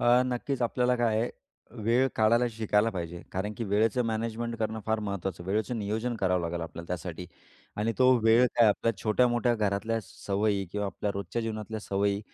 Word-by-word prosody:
अ, 120 +1 +5
नक्कीच 125 +1 -2
आपल्याला 125 +1 +2
काय 115 -2 +2
आहे 120 - 0 0.4
अ, - - -19
वेळ 120 +4 +3
काढायला 115 +3 +4
शिकायला 110 0 +1
पाहिजे. 85 -3 -5
कारण 100 +3 -2
की 115 - -3
वेळेचं 115 +5 +2
मॅनेजमेंट 115 +1 -2
करणं 110 0 -2
फार 110 0 +1
महत्त्वाचं. 95 -4 -4
वेळेचं 110 +5 -1
नियोजन 110 +4 -2
करावं 90 -3 +1
लागेल 85 0 -3
आपल्याला 85 0 -7
त्यासाठी 90 0 -5 0.5
आणि 110 +2 0
तो 130 0 +6
वेळ 115 +3 +6
काय 115 - +6
आपल्या 115 +2 +1
छोट्या-मोठ्या 120 +2 +2
घरातल्या 110 +1 0
सवयी 100 0 -1
किंवा 105 0 -1
आपल्या 100 +1 -3
रोजच्या 100 +4 -3
जीवनातल्या 110 0 -4
सवयी 100 0 0
110 Hz, 175 wpm, -28 LUFS, 100-115 Hz, 0.5 s, तो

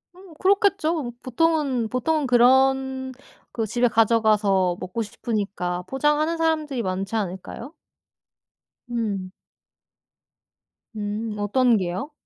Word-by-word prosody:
음 370 -2 -15
그렇겠죠. 345 - +2
보통은, 270 -3 +1
보통은 295 +4 0
그런 260 +1 +3 0.4
그 225 - -1
집에 240 +3 +1
가져가서 210 -5 +2
먹고 185 +5 -4
싶으니까 200 -5 -3
포장하는 300 +4 +1
사람들이 310 -5 0
많지 190 +3 -3
않을까요? 205 - -5 1.2
음. 205 -6 -3 1.6
음 210 +1 -4
어떤 235 +3 +3
게요? 185 - -3
240 Hz, 225 characters per minute, -23 LUFS, 205-290 Hz, 1.6 s, 그런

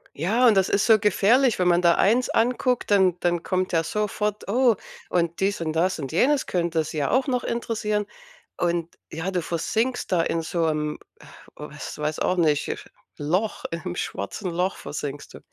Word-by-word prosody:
Ja, 215 - +2
und 225 - +6
das 190 - +3
ist 200 +1 +1
so 220 -2 +6
gefährlich, 225 +5 +3
wenn 180 -1 +2
man 175 0 +3
da 170 -1 +5
eins 235 +6 +3
anguckt, 250 0 +1
dann 190 -3 +4
dann 175 -1 0
kommt 185 0 -1
ja 165 -1 +2
sofort: 210 +2 -2
„Oh, 245 0 +4 0.3
und 170 -1 0
dies 195 -1 0
und 160 -1 -1
das 175 +1 +1
und 135 -2 -5
jenes 270 - +2
könnte 170 -2 0
Sie 155 +1 -6
ja 145 -2 0
auch 260 +3 +2
noch 250 -2 -1
interessieren.“ 215 -3 -1 0.5
Und, 170 -1 -1
ja, 165 +5 -4
du 180 -2 -1
versinkst 225 +8 -2
da 170 - +3
in 165 0 -1
so 165 +1 -1
'em, 150 -1 -2 0.6
was 150 -1 -8
weiß 150 +1 -2
auch 185 - 0
nicht, 150 -4 +2 0.5
Loch 180 +9 -1
im 175 +1 -4
schwarzen 185 0 -4
Loch 180 +3 -1
versinkst 145 -1 -6
du. - - -10
180 Hz, 180 wpm, -24 LUFS, 165-215 Hz, 0.6 s, und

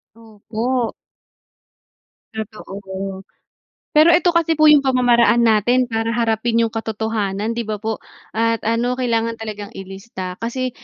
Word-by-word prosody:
Opo. 230 +2 -3 1.4
Totoo, 195 -3 -7 0.7
pero 320 +3 +7
eto 350 +1 +4
kasi 330 -1 +3
po 310 0 +5
yung 290 -2 +6
pamamaraan 240 -2 +4
natin 240 +3 +3
para 225 +1 -1
harapin 230 0 +1
yung 230 - +2
katotohanan, 220 -1 -2
'di 235 - -1
ba 210 -1 -4
po? 220 0 -2 0.4
At 230 0 +1
ano, 235 +3 0
kailangan 230 -2 0
talagang 210 0 -6
ilista 190 -1 -7
kasi 255 +2 -2
225 Hz, 120 wpm, -20 LUFS, 210-240 Hz, 1.4 s, pero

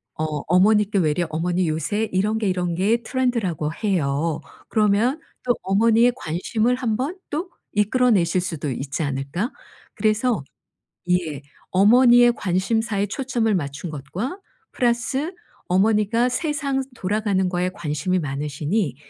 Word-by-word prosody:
어 155 - -3 0.2
어머니께 205 +3 +4
외려 160 0 +1
"어머니 175 +3 0
요새 200 +8 -1
이런 210 +4 +1
게 215 -3 0
이런 180 -2 -1
게 210 +7 +2
트렌드라고 220 - -1
해요." 160 -4 0 0.3
그러면 215 +6 +2 0.2
또 245 -2 +2
어머니의 225 +5 +4
관심을 220 +5 0
1 235 -4 -1
번 300 +9 -3
또 325 +5 -3 0.2
이끌어 240 +5 +3
내실 180 -3 +2
수도 165 -5 -3
있지 135 +5 -3
않을까? 140 - -2 0.4
그래서 215 - +1 0.7
예. 165 -6 0 0.3
'어머니의 240 +5 +6
관심사에 200 +2 0
초점을 235 -1 -1
맞춘 145 +1 -4
것과 180 - -5 0.3
플러스 255 +7 0 0.3
어머니가 215 +5 +2
세상 280 -1 -1
돌아가는 200 -2 0
거에 180 0 0
관심이 170 +4 -1
많으시니 145 - -2
200 Hz, 285 characters per minute, -22 LUFS, 170-235 Hz, 0.7 s, 어머니의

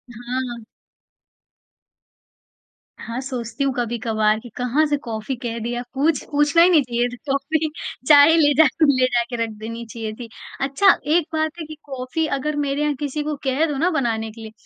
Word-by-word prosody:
हाँ। 245 0 -4 2.3
हाँ, 235 +2 -6
सोचती 255 0 -4
हूँ 275 -2 +1
कभी-कभार 225 -2 0
कि 240 - -12
कहाँ 250 +5 +1
से 290 - +1
कॉफ़ी 230 0 -5
कह 235 -2 -3
दिया, 240 +1 -3
पूछ 290 +2 +1
पूछना 295 +3 +4
ही 350 - +7
नहीं 325 -5 +5
चाहिए 240 -1 0
था 245 - -8 0.2
कॉफ़ी, 310 +3 0 0.4
चाय 295 +1 +8
ही 330 - +4
ले 290 -2 +4
जा 320 - +8 0.2
ले 265 -4 +4
जा 240 -1 +1
के 245 - -4
रख 225 - -3
देनी 230 +2 -7
चाहिए 225 -1 -6
थी। 235 -2 -8 0.3
अच्छा 275 +9 +1 0.3
एक 345 -3 +2
बात 315 0 0
है 320 - -5
कि 310 - -9
कॉफ़ी 270 +3 -3
अगर 300 +3 -2
मेरे 285 0 -1
यहाँ 300 -1 +1
किसी 295 +1 -3
को 300 0 -2
कह 270 +4 +1
दो 295 -3 -3
ना 335 +6 +2
बनाने 225 -8 -1
के 225 - -13
लिए, 220 -1 -9
265 Hz, 190 wpm, -21 LUFS, 235-295 Hz, 2.3 s, चाय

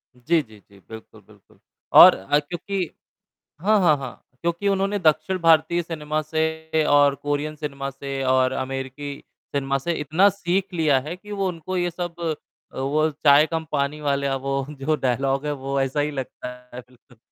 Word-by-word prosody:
जी, 155 +7 +1
जी, 110 -3 -17
जी। 100 -1 -19
बिल्कुल, 110 0 -12
बिल्कुल। - - -23 0.4
और - - +10
अ, 120 +10 +1
क्योंकि 175 +4 -4 0.7
हाँ, 210 +2 +3
हाँ, 155 -6 +4
हाँ 130 -3 -9 0.2
क्योंकि 170 +4 -1
उन्होंने 195 +1 0
दक्षिण 155 +2 +2
भारतीय 165 +1 +4
सिनेमा 155 -2 -3
से 160 0 -1
और 145 -1 +5
कोरियन 145 +2 -3
सिनेमा 140 -2 -5
से 135 0 -5
और 130 0 +3
अमेरिकी 135 +2 -5 0.4
सिनेमा 135 0 0
से 170 +5 -2
इतना 160 +8 +3
सीख 190 0 -2
लिया 155 -5 +3
है 170 - -4
कि 210 +3 -13
वो 195 -2 -1
उनको 180 +1 -4
ये 175 0 0
सब 175 0 -6 0.5
अ, - - -10
वो 155 +4 +1
चाय 145 0 +5
कम 160 -1 -2
पानी 145 +1 -1
वाले 140 -1 0
अब 135 -1 -2
वो 135 0 -2
जो 150 +1 -1
डायलॉग 135 +2 -1
है 150 - -1
वो 140 0 -1
ऐसा 135 +2 -1
ही 150 +1 0
लगता 130 -2 -6 0.3
है 125 - -7
बिल्कुल। 125 -1 -23
150 Hz, 175 wpm, -23 LUFS, 135-170 Hz, 0.7 s, और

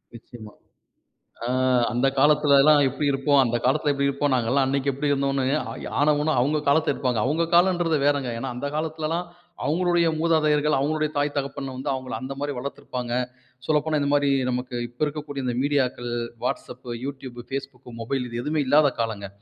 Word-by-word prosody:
நிச்சயமா. 110 -2 -12 0.9
அ - - -2 0.4
அந்த 125 +3 +1
காலத்திலலாம் 145 0 +5
எப்டி 140 +3 -3
இருப்போம், 140 +1 +2
அந்த 120 0 0
காலத்தில 145 +2 +2
எப்டி 140 0 0
இருப்போம். 140 0 0
நாங்கலாம் 125 +3 +2
அன்னைக்கு 140 +1 0
எப்பிடி 145 +2 -2
இருந்தோம்ன்னு 135 -1 0 0.3
ஆயி - - -7
ஆனா 150 +1 +4
ஊனா 155 +1 +1
அவங்க 150 +3 +1
காலத்த 145 0 +3
இழுப்பாங்க. 125 -4 -1
அவங்க 155 +5 +1
காலம்ன்றது 175 -3 +3
வேறங்க. 140 -3 +1
ஏன்னா, 130 +2 -4
அந்த 145 +3 -3
காலத்திலல்லாம் 160 +2 -2 0.4
அவங்களுடைய 170 +2 +2
மூதாதையர்கள், 155 -2 +2
அவங்களுடைய 155 +2 0
தாய், 145 0 0
தகப்பன் 135 -1 -4
வந்து, 135 +2 -4
அவங்கள 130 -1 -5
அந்த 130 +1 -5
மாரி 145 0 -2
வளர்த்திருப்பாங்க. 125 -2 -5 0.5
சொல்லப்போனா 155 0 +1
இந்த 140 0 0
மாரி, 145 -1 +3 0.2
நமக்கு 125 0 -3
இப்ப 120 +5 -5
இருக்கக்கூடிய 145 -2 -5
இந்த 120 -1 -1
மீடியாக்கள், 130 -4 0 0.3
Whatsapp, 125 +1 -4 0.2
Youtube, 130 -3 -7
Facebook, 135 -2 -6 0.2
மொபைல் 125 +3 -2
இது 120 0 -5
எதுவுமே 150 0 0
இல்லாத 145 +2 +5
காலங்க. 105 -3 -2
140 Hz, 160 wpm, -24 LUFS, 130-150 Hz, 0.9 s, காலத்திலலாம்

